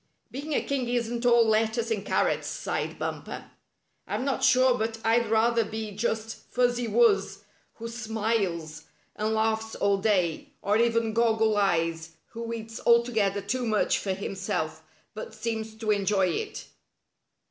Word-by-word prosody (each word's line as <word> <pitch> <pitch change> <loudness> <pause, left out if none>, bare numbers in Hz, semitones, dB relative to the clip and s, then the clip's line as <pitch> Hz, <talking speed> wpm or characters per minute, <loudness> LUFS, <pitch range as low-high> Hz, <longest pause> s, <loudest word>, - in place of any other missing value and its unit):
"Being 290 +4 -5
a - - +1
king 265 -3 -2
isn't 240 0 -1
all 235 -1 +5
lettuce 220 +1 +1
and 210 -3 -1
carrots," - - 0
sighed - - -3
Bumper. - - -5 0.6
"I'm 255 - -2
not 270 -1 -1
sure 255 -1 +5
but 225 -1 -2
I'd 230 0 +3
rather 230 +1 +3
be 220 0 -5
just 220 +2 -2
Fuzzy 245 -1 +1
Wuzz, 455 - +2 0.3
who 230 - -7
smiles 215 -8 -2 0.3
and 215 +1 -1
laughs 220 0 0
all 200 -1 +1
day, 185 -6 0
or 205 - +2
even 230 -1 +2
Goggle 225 -1 +2
Eyes, 165 -4 0 0.2
who 230 0 -6
eats 225 -1 -6
altogether 225 -4 +3
too 245 +6 -2
much 215 -2 +2
for 195 - -2
himself, 185 -5 -3 0.3
but 215 0 -8
seems 220 0 -4
to 220 -1 -1
enjoy 200 -2 +2
it." 165 - -4
220 Hz, 145 wpm, -27 LUFS, 205-235 Hz, 0.6 s, all